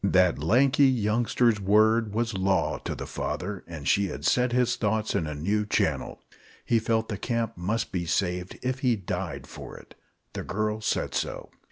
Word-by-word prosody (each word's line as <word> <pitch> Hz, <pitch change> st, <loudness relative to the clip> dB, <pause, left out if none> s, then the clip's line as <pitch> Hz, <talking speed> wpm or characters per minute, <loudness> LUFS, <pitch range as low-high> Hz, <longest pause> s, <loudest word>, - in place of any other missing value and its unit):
That 90 Hz, -4 st, +3 dB
lanky 130 Hz, -, +4 dB
youngster's 115 Hz, -1 st, +2 dB
word 110 Hz, +2 st, +3 dB
was 115 Hz, +2 st, -1 dB
law 95 Hz, 0 st, +1 dB
to -, -, -2 dB
the -, -, -6 dB
father, 100 Hz, +1 st, -4 dB
and 80 Hz, -4 st, -7 dB
she 100 Hz, 0 st, +3 dB
had -, -, -6 dB
set 125 Hz, 0 st, +3 dB
his 125 Hz, 0 st, +2 dB
thoughts 110 Hz, 0 st, 0 dB
in 80 Hz, -, 0 dB
a 75 Hz, -, -4 dB
new 100 Hz, +8 st, 0 dB
channel. 105 Hz, -, -1 dB, 0.4 s
He 115 Hz, -, +3 dB
felt 110 Hz, 0 st, 0 dB
the 105 Hz, -4 st, -4 dB
camp 115 Hz, -2 st, -2 dB
must 105 Hz, +6 st, -2 dB
be 85 Hz, -2 st, -2 dB
saved, 90 Hz, +1 st, -1 dB
if 130 Hz, +1 st, -1 dB
he 125 Hz, -3 st, +2 dB
died 90 Hz, -7 st, -4 dB
for -, -, -10 dB
it. -, -, -15 dB, 0.4 s
The -, -, -4 dB
girl 110 Hz, 0 st, -2 dB
said 110 Hz, -, -1 dB
so. -, -, -3 dB
105 Hz, 180 wpm, -27 LUFS, 95-115 Hz, 0.4 s, lanky